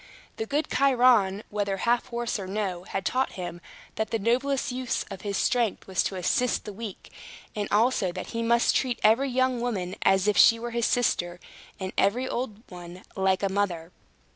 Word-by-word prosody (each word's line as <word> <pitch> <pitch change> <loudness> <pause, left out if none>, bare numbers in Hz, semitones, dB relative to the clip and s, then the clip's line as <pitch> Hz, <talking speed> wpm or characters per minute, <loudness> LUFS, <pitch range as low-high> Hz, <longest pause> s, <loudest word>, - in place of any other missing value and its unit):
The 220 - -3
good 295 +4 0
Chiron, 245 -7 +3
whether 200 -2 -1
half 235 +4 +1
horse 235 -2 -3
or 190 - -6
no, 190 -3 -3
had 195 - -4
taught 260 +1 0
him 175 -2 -6 0.4
that 220 - -1
the 225 - 0
noblest 255 +6 0
use 250 0 -2
of 195 - -7
his 200 -2 -3
strength 240 -5 0
was 190 -2 0
to 195 - -2
assist 230 +7 0
the 210 - -6
weak; 215 -1 -8 0.4
and 205 -1 -2
also 215 -3 +2
that 185 +1 -7
he 230 - -2
must 235 +1 +3
treat 250 -3 0
every 250 +6 +4
young 255 -1 +1
woman 195 -7 -2
as 195 +1 +3
if 210 - +2
she 230 - +7
were 235 +1 -5
his 235 -1 0
sister, 175 -7 0 0.4
and 190 -1 -5
every 240 +7 +2
old 235 -4 -4
one 175 0 -10
like 190 0 +1
a - - +3
mother. 185 -4 -2
215 Hz, 190 wpm, -26 LUFS, 190-245 Hz, 0.4 s, she